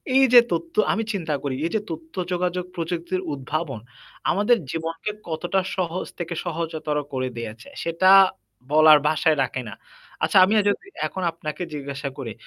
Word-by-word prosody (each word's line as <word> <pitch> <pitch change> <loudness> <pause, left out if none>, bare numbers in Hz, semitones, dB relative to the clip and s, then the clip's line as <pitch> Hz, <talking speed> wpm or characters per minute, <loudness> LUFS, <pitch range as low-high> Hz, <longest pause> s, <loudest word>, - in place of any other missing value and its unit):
এই 270 - +7
যে 240 - +12
তথ্য 165 0 -3 0.2
আমি 225 +3 0
চিন্তা 165 -6 -2
করি, 135 -2 -2
এই 170 - -2
যে 220 - +3
তথ্য 160 +1 -8 0.2
যোগাযোগ 180 0 -1
প্রযুক্তির 175 +2 -2
উদ্ভাবন 140 -2 -3 0.5
আমাদের 210 +4 +3
জীবনকে 165 +5 -3 0.2
কতটা 175 +4 -1
সহজ 180 -1 -2
থেকে 170 0 -3
সহজতর 160 -3 -3 0.2
করে 130 0 -1
দিয়েছে, 115 0 -7 0.2
সেটা 170 +3 +2 0.6
বলার 155 0 +7
ভাষায় 155 0 +2
রাখে 130 0 -3
না। - - -8 0.5
আচ্ছা - - +3
আমিও 210 +2 +3
যদি 205 - -2 0.2
এখন 190 - -5
আপনাকে 160 +1 -5
জিজ্ঞাসা 140 -1 -5
করি 120 -5 -5
165 Hz, 155 wpm, -23 LUFS, 150-180 Hz, 0.6 s, যে